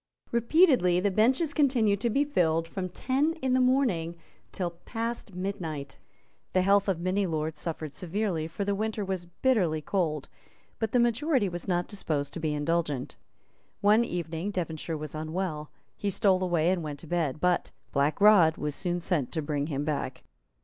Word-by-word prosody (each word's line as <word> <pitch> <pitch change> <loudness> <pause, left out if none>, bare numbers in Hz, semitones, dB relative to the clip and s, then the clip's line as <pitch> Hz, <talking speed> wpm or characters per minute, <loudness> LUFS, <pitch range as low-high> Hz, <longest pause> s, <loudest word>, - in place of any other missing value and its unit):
Repeatedly 235 - +4
the 200 +2 +1
benches 260 - +2
continued 235 -9 +2
to 235 - +1
be 275 +6 +2
filled 165 - +1
from 185 +2 -4
ten 275 - 0
in 265 -6 -1
the 255 - +4
morning 240 -11 +2 0.4
till 180 -2 -2
past 225 +3 -5
midnight. 165 -7 -4 0.5
The 185 - +3
health 200 +1 +4
of 185 -4 0
many 185 +3 0
lords 155 -1 -2
suffered 155 -3 -4
severely; 180 -2 -2
for 195 +5 -4
the 200 - +1
winter 215 0 -2
was 190 -2 -3
bitterly 175 -4 +1
cold; 155 -3 -1 0.5
but 225 -1 -1
the 250 - +3
majority 240 0 +2
was 175 0 -5
not 175 -1 0
disposed 155 -9 -3
to - - -5
be 160 -1 -1
indulgent. 150 -3 -1 0.7
One 210 +3 +5
evening 170 -2 -3
Devonshire 165 -4 -3
was 150 -1 -6
unwell; 155 0 -3 0.3
he 205 - -2
stole 190 -1 +3
away 175 -2 +2
and 185 -2 0
went 150 -2 -5
to 165 - -11
bed; 155 -4 -1
but 180 +1 +1 0.2
Black 140 +4 +1
Rod 200 -6 +6
was 150 -1 -2
soon 175 +2 -1
sent 165 -6 -1
to 160 - -1
bring 145 -1 -1
him 145 -2 -2
back. 140 -4 -3
180 Hz, 170 wpm, -28 LUFS, 160-215 Hz, 0.7 s, Rod